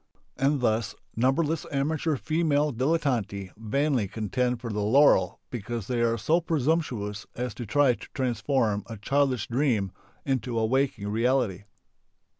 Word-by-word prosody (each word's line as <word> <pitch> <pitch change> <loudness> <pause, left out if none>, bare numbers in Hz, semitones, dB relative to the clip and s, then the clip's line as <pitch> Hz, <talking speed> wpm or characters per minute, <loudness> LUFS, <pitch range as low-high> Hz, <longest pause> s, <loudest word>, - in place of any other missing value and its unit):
And 140 0 +1
thus 110 -2 0 0.2
numberless 145 +6 +1
amateur 150 +2 0
female 150 0 +1
dilettanti 120 - -1
vainly 120 +1 0
contend 125 +4 -1
for 115 -2 -5
the 105 - -1
laurel 105 -4 +4
because 120 -2 -4
they 120 +1 -1
are 115 0 +2
so 160 - +2
presumptuous 140 -10 -1
as 125 -1 -3
to 120 - -7
try 140 +2 +4
to - - -11
transform 120 -4 0
a 115 - -7
childish 135 0 +1
dream 120 -7 +1 0.3
into 125 -3 -1
a 110 - +2
waking 130 -4 0
reality. 115 -3 +1
125 Hz, 135 wpm, -27 LUFS, 110-140 Hz, 0.3 s, laurel